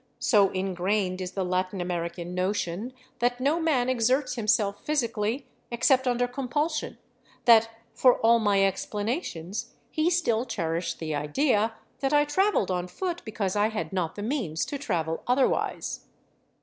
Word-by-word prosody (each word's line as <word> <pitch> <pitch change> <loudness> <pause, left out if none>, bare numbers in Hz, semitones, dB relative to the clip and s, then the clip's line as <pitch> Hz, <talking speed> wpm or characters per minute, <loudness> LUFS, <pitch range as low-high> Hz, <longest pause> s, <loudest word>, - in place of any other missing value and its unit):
So 200 -4 +4
ingrained 185 0 -1
is 185 0 -5
the 190 -2 -1
Latin 185 +1 -1
American 175 0 -3
notion 185 +3 -2 0.3
that 245 +1 +1
no 285 +6 +2
man 290 -7 +2
exerts 255 +2 +1
himself 210 -3 +1
physically, 235 -3 -1 0.2
except 255 +2 +2
under 245 0 +2
compulsion, 290 +5 -2 0.5
that, 230 -1 +7 0.2
for 255 -1 +5
all 230 +1 +5
my 200 -3 +3
explanations, 205 - -3 0.2
he 315 +2 +2
still 245 -11 +1
cherished 170 -8 -2
the 155 -2 -4
idea 215 - +1 0.2
that 270 +1 0
I 295 0 +5
traveled 335 - +1
on 180 0 -1
foot 350 - -4
because 205 -4 -2
I 205 +1 +3
had 170 -6 -4
not 175 -4 -1
the 205 - -5
means 210 - -1
to 285 - -5
travel 165 - -2
otherwise. 255 +2 0
220 Hz, 145 wpm, -27 LUFS, 185-255 Hz, 0.5 s, that